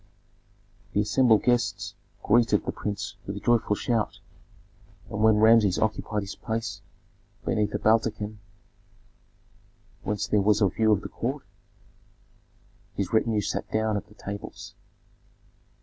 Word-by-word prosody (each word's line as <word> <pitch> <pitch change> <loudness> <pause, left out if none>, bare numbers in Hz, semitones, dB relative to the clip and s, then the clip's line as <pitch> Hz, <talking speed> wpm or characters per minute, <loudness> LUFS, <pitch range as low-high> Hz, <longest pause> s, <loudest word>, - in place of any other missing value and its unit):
The 105 - +3
assembled 110 +1 +3
guests 120 -4 0 0.3
greeted 115 -2 +3
the - - -1
prince 100 0 -5
with 100 +1 -4
a - - -4
joyful 115 -2 +2
shout, 115 0 -1 0.9
and 105 - -3
when 110 0 +5
Rameses 110 -3 +5
occupied 105 -1 -1
his 100 - -6
place 110 0 -4 0.6
beneath 105 -1 0
a - - +2
baldachin 110 -1 +1 1.6
whence 105 0 -2
there 105 - +2
was 105 +1 +3
a 100 -3 +4
view 110 +2 +2
of 100 -2 +3
the - - -7
court, 135 +4 -3 1.5
his 100 0 -3
retinue 110 -1 +2
sat - - -3
down 110 0 +1
at 100 - -4
the 105 - -19
tables. 100 -1 -8
105 Hz, 130 wpm, -26 LUFS, 105-115 Hz, 1.6 s, when